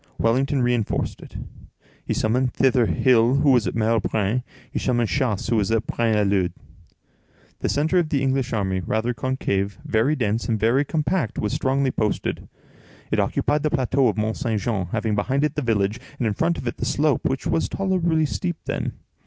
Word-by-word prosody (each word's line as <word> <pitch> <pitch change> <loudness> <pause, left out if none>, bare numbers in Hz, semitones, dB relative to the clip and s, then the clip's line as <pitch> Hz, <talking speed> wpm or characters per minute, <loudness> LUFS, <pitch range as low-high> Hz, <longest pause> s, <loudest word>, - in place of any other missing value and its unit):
Wellington 130 +3 +1
reinforced 120 -3 -1
it. - - -13 0.7
He - - -2
summoned 125 +3 0
thither 130 -3 +3
Hill, 125 -1 +3
who 140 0 +4
was 120 -4 +3
at - - -3
Merle 115 0 +2
Braine; 110 +3 0 0.3
he - - -2
summoned 120 -3 0
Chassé, 120 -5 -1
who 115 - +3
was 105 -1 +1
at 115 -1 +1
Braine 115 -2 0
l'Alleud. 100 -4 +1 1.1
The - - -1
centre 160 +5 +2
of 165 -3 0
the 140 -3 0
English 135 -1 0
army, 95 -4 0
rather 110 +7 -1
concave, 105 -5 -2
very 120 +8 +2
dense, 115 -4 -1
and 110 -2 +1
very 120 +6 +3
compact, 155 - -1
was 105 - -1
strongly 135 0 +1
posted. 110 -3 -2 0.6
It - - +2
occupied 150 0 +1
the 155 - +1
plateau 135 -3 +2
of 110 - 0
Mont 110 +1 -1
Saint 115 -6 -1
Jean, 100 -3 -2
having 110 +3 -1
behind 130 +8 0
it 150 -1 +1
the 150 - -2
village, 110 -3 0 0.2
and 125 - -1
in 110 - +1
front 165 +8 0
of - - -6
it 120 - -3
the - - -3
slope, 150 0 +1
which 130 -1 -1
was 80 +3 0
tolerably 175 -5 +1
steep 175 +3 -3
then. - - -2
120 Hz, 190 wpm, -23 LUFS, 110-140 Hz, 1.1 s, who